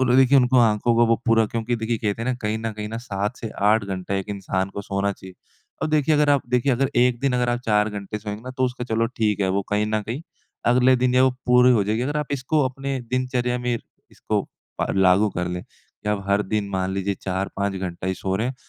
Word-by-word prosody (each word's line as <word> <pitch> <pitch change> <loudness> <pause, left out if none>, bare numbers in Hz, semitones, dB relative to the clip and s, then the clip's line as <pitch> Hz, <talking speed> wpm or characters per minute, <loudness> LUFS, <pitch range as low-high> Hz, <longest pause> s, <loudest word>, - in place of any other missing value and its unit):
वो - - +4
लोग 125 0 +3
देखिए 135 +1 +6
उनको 125 0 +4
आँखों 115 0 +3
को 120 0 +4
वो 115 0 +3
पूरा 115 -1 +4
क्योंकि 115 +2 -2
देखिए 115 0 -2
कहते 105 +1 -2
हैं 125 - -2
ना 130 - +1
कहीं 110 +1 -1
न 115 0 -3
कहीं 105 0 -6
ना 115 - -5
7 105 0 -3
से 115 - -6 0.2
8 110 -1 +3
घंटा 95 0 -4
एक 95 +1 -3
इंसान 95 -1 -2
को 100 - -4
सोना 100 0 -1
चाहिए। 95 -1 -12 0.5
अब - - 0
देखिए 155 0 +3
अगर 150 -1 +3
आप 140 -2 +3
देखिए 125 +2 +2
अगर 130 +2 +1
1 125 -1 +3
दिन 135 -2 +1
अगर 125 -1 +1
आप 120 0 +1
4 105 -1 +3
घंटे 105 0 -5
सोएँगे 105 0 -6
ना 130 - -7
तो 130 - +2
उसका 125 -1 -3
चलो 115 -1 0
ठीक 105 -2 +1
है 95 - +2
वो 100 +1 0
कहीं 105 +1 +1
न 110 0 0
कहीं 115 +8 -5 0.5
अगले 125 +1 +5
दिन 125 0 +1
या 130 - +5
वो 130 - +4 0.2
पूरी 125 0 +6
हो 105 -4 +3
जाएगी। 110 +3 0
अगर 145 +4 -2
आप 150 -1 -1
इसको 140 +3 0
अपने 135 +1 -4
दिनचर्या 125 -1 0
में 125 0 -1 0.4
इसको - - -2 0.4
प - - +1
लागू 95 +2 +4
कर 90 -1 -3
लें 90 0 -4
कि 105 - -12
अब 105 -1 0
हर 100 +1 +3
दिन 105 0 -2
मान 95 -1 -1
लीजिए 100 +1 -1
4-5 95 +1 -2
घंटा 90 -1 -5
ही 95 - 0
सो 95 0 -3
रहे 115 +4 -1
हैं। 130 - -3
110 Hz, 255 wpm, -23 LUFS, 100-125 Hz, 0.5 s, देखिए